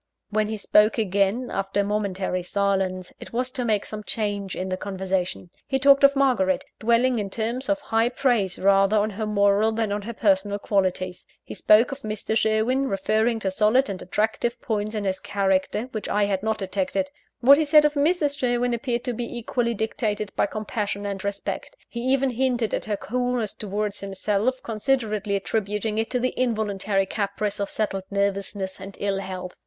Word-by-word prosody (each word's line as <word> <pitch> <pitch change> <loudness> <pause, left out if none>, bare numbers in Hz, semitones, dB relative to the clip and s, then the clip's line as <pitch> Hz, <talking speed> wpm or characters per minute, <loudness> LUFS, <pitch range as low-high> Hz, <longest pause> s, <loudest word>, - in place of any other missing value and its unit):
When 215 0 +1
he 220 0 -3
spoke 210 +1 +4
again, 200 +3 +1
after 195 +1 -1
a - - 0
momentary 195 -3 -1
silence, 190 -1 -1
it - - -10
was 250 +2 -1
to 250 - -3
make 215 -4 +1
some 215 -1 -6
change 205 -3 -3
in 185 +1 -3
the 185 - 0
conversation. 190 -2 -3 0.2
He 270 - +1
talked 275 +1 +5
of 280 0 +7
Margaret 245 -9 +2
dwelling 235 +2 +3
in 200 -2 -3
terms 235 +6 -3
of 295 0 +2
high 225 -2 +1
praise 240 -8 +1
rather 195 +2 +4
on 210 +1 +1
her 215 +2 -4
moral 205 +1 +3
than 220 -2 -1
on 205 +1 -1
her 230 +4 -6
personal 205 -2 +2
qualities. 185 -3 -1 0.2
He - - -8
spoke 215 +5 +4
of 275 - -5
Mr. 215 -1 -3
Sherwin, 225 +5 +2
referring 220 +3 +1
to 190 - -1
solid 215 +5 +3
and 185 - -6
attractive 220 +5 -1
points 215 -1 -2
in 210 - -2
his 190 -1 -1
character 195 +1 0
which 215 - -5
I 205 0 +2
had 195 -2 -1
not 220 +1 0
detected. 195 +9 -2 0.3
What 280 +4 +7
he - - +3
said 300 0 +6
of 300 - +2
Mrs. 295 -1 +1
Sherwin 245 -1 +1
appeared 235 0 -2
to 250 - -2
be 240 +1 -5
equally 235 0 -1
dictated 215 -1 -2
by - - +2
compassion 205 -1 -3
and 195 -1 -4
respect 200 - -4
he 235 - -6
even 265 +2 +1
hinted 245 -2 0
at - - -1
her 210 -2 -1
coolness 245 -2 -1
towards 205 0 -3
himself, 205 +6 -1
considerately 215 -3 0
attributing 210 +1 -1
it 225 - -1
to 250 - 0
the 255 +1 0
involuntary 210 -5 0
caprice 200 +1 -2
of 200 - -2
settled 195 -3 -2
nervousness 200 -1 -2
and 195 +1 -9
ill 200 -1 0
health. 185 -1 -6
215 Hz, 185 wpm, -24 LUFS, 195-240 Hz, 0.3 s, of